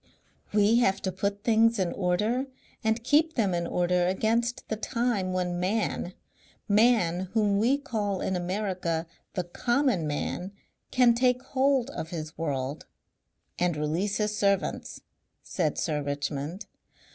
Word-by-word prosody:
We 210 Hz, +2 st, +4 dB
have 195 Hz, -5 st, +2 dB
to 190 Hz, -, 0 dB
put 200 Hz, +2 st, -2 dB
things 230 Hz, 0 st, +4 dB
in 185 Hz, -3 st, 0 dB
order 210 Hz, +8 st, 0 dB, 0.4 s
and 220 Hz, +1 st, +1 dB
keep 315 Hz, +5 st, +3 dB
them 205 Hz, -6 st, +1 dB
in 170 Hz, 0 st, -1 dB
order 180 Hz, 0 st, +1 dB
against 230 Hz, +5 st, 0 dB
the 220 Hz, -, -2 dB
time 225 Hz, -4 st, -1 dB
when 180 Hz, -1 st, -1 dB
Man 185 Hz, -1 st, -1 dB, 0.5 s
Man 205 Hz, -5 st, +3 dB
whom 205 Hz, -2 st, +3 dB
we 250 Hz, +6 st, +3 dB
call 210 Hz, -9 st, -2 dB
in 190 Hz, -, -1 dB
America 180 Hz, -3 st, -2 dB, 0.3 s
the 180 Hz, -, 0 dB
Common 240 Hz, -, 0 dB
Man 180 Hz, +6 st, -3 dB, 0.4 s
can 250 Hz, -2 st, +5 dB
take 250 Hz, +1 st, +2 dB
hold 270 Hz, -1 st, +1 dB
of 160 Hz, -, -5 dB
his 155 Hz, -2 st, -6 dB
world 140 Hz, -3 st, -3 dB, 0.4 s
" -, -, -22 dB
"And 175 Hz, -3 st, +1 dB
release 165 Hz, +7 st, -1 dB
his 210 Hz, 0 st, 0 dB
servants," 200 Hz, -2 st, 0 dB, 0.4 s
said 160 Hz, -5 st, -1 dB
Sir 150 Hz, -3 st, -1 dB
Richmond. 145 Hz, +5 st, -3 dB
200 Hz, 140 wpm, -28 LUFS, 175-230 Hz, 0.5 s, can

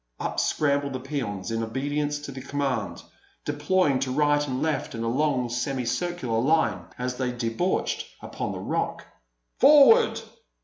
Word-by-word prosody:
Up -, -, -2 dB
scrambled 140 Hz, -2 st, +1 dB
the 130 Hz, -, -3 dB
peons 120 Hz, -8 st, -4 dB
in 115 Hz, 0 st, -1 dB
obedience 145 Hz, +5 st, -2 dB
to 145 Hz, -, -7 dB
the 130 Hz, 0 st, -8 dB
command, 135 Hz, -7 st, -2 dB, 0.4 s
deploying 145 Hz, -1 st, +1 dB
to 135 Hz, 0 st, -2 dB
right 145 Hz, +1 st, +2 dB
and 130 Hz, -1 st, -2 dB
left 155 Hz, -5 st, -1 dB
in 115 Hz, -, -4 dB
a -, -, -1 dB
long, 130 Hz, 0 st, +1 dB
semicircular 125 Hz, +2 st, -2 dB
line 160 Hz, +7 st, +1 dB
as 125 Hz, 0 st, -3 dB
they 125 Hz, -1 st, -1 dB
debouched 120 Hz, +9 st, -1 dB
upon -, -, -5 dB
the -, -, -5 dB
Rock. -, -, -2 dB, 0.5 s
"Forward!" 300 Hz, -, +7 dB
135 Hz, 145 wpm, -26 LUFS, 125-150 Hz, 0.5 s, Forward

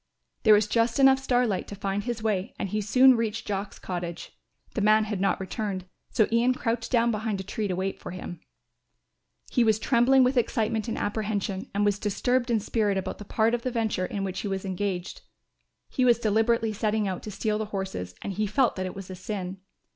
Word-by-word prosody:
There 215 Hz, -2 st, +7 dB
was 210 Hz, 0 st, +3 dB
just 230 Hz, +2 st, +1 dB
enough 270 Hz, -1 st, +6 dB
starlight 245 Hz, -6 st, +1 dB
to 205 Hz, -, -7 dB
find 200 Hz, 0 st, -2 dB
his 240 Hz, -3 st, -3 dB
way 205 Hz, -4 st, -1 dB
and 195 Hz, -, -3 dB
he 215 Hz, +3 st, -1 dB
soon 255 Hz, +6 st, +6 dB
reached 220 Hz, -1 st, -2 dB
Jock's 200 Hz, 0 st, -3 dB
cottage. 175 Hz, -2 st, -5 dB, 0.4 s
The 220 Hz, -, -1 dB
man 215 Hz, +1 st, +5 dB
had 210 Hz, -3 st, -3 dB
not 195 Hz, -, +1 dB
returned, 190 Hz, -1 st, -4 dB, 0.2 s
so 215 Hz, -, +3 dB
Ian 240 Hz, +2 st, +3 dB
crouched 230 Hz, -1 st, -2 dB
down 235 Hz, -1 st, +3 dB
behind 215 Hz, -2 st, -2 dB
a -, -, -4 dB
tree 210 Hz, +2 st, -3 dB
to 185 Hz, -, -1 dB
wait 190 Hz, +1 st, -3 dB
for -, -, -8 dB
him. 175 Hz, -2 st, -7 dB, 1.1 s
He 245 Hz, -, +3 dB
was 220 Hz, -2 st, +3 dB
trembling 245 Hz, +4 st, +4 dB
with 255 Hz, +1 st, +2 dB
excitement 225 Hz, -1 st, 0 dB
and 225 Hz, -, -2 dB
apprehension 205 Hz, -2 st, -2 dB
and 205 Hz, +1 st, +2 dB
was 205 Hz, -1 st, +1 dB
disturbed 245 Hz, +5 st, 0 dB
in 230 Hz, -2 st, +3 dB
spirit 210 Hz, -1 st, 0 dB
about 190 Hz, 0 st, -4 dB
the 210 Hz, -, -8 dB
part 220 Hz, +3 st, +1 dB
of 240 Hz, -, 0 dB
the 255 Hz, -, -1 dB
venture 220 Hz, -6 st, -1 dB
in 200 Hz, -, -3 dB
which 190 Hz, -1 st, -3 dB
he -, -, -3 dB
was 195 Hz, 0 st, -3 dB
engaged. 190 Hz, -1 st, -3 dB, 0.7 s
He 255 Hz, -, -1 dB
was 240 Hz, -2 st, +5 dB
deliberately 225 Hz, 0 st, +1 dB
setting 210 Hz, 0 st, 0 dB
out 185 Hz, -2 st, -3 dB
to -, -, -7 dB
steal 210 Hz, +1 st, -1 dB
the 215 Hz, -, -1 dB
horses 190 Hz, -, -5 dB
and 200 Hz, -, -3 dB
he 210 Hz, +2 st, -1 dB
felt 250 Hz, +4 st, +2 dB
that 185 Hz, 0 st, -2 dB
it 185 Hz, -, -7 dB
was 195 Hz, -1 st, -8 dB
a -, -, -6 dB
sin. 190 Hz, 0 st, -5 dB
210 Hz, 215 wpm, -27 LUFS, 195-230 Hz, 1.1 s, There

